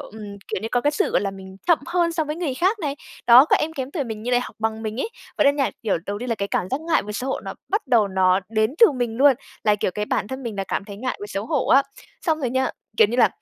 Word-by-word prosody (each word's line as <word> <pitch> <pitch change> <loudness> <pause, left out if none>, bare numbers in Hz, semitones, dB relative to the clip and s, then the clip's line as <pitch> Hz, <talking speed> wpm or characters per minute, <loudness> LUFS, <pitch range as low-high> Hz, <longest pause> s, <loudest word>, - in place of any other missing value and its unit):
ừm, 210 -2 -9
kiểu - - -2
như 225 - -2
có 245 - +3
cái 290 +4 +2
sự, 300 - 0
gọi - - +2
là, 200 - -1
mình 190 -1 -11
chậm 340 -3 +5
hơn 340 -1 +1
so 325 -1 0
với 300 +1 -4
người 325 -7 -2
khác 380 - +1
này, 290 -5 -3 0.3
đó, 245 +3 +9
các - - +3
em 320 - -2
kém 270 -3 -5
tuổi 290 -5 -2
mình 220 -2 -6
như 245 - -3
lại 245 0 +3
học - - -8
bằng 220 0 -2
mình 220 +3 -3
ấy. - - -1 0.3
Vậy - - +4
nên 285 +1 +4
nha, 275 - +1
kiểu, 205 -6 +1
đầu 205 +1 -3
tiên 250 +2 -5
là 230 - +1
cái 200 -1 -3
cảm 180 - -1
giác 265 - -1
ngại 325 0 +1
và 210 +1 -6
xấu 255 +5 -3
hổ - - -2
nó - - -7
bắt 410 -2 -1
đầu 230 -5 +3
nó 190 0 +3
đến 220 +3 +1
từ 460 - +9
mình 240 -3 -2
luôn, 275 +2 +6 0.3
là, 210 -1 +4
kiểu, 205 - -1
cái 210 +3 -3
bản 205 - -1
thân 265 0 -6
mình 230 -3 -4
là 195 - -2
cảm 195 - -3
thấy 200 -1 -9
ngại 255 +4 -3
và 205 - -5
xấu 205 0 -4
hổ 295 -4 0
á. 275 +1 +6 0.4
Xong 315 -1 +1
rồi 255 - -1
nha, 260 +1 +1 0.3
kiểu 220 - +6
như 240 - -2
là, 255 - +6
245 Hz, 315 wpm, -23 LUFS, 210-285 Hz, 0.4 s, đó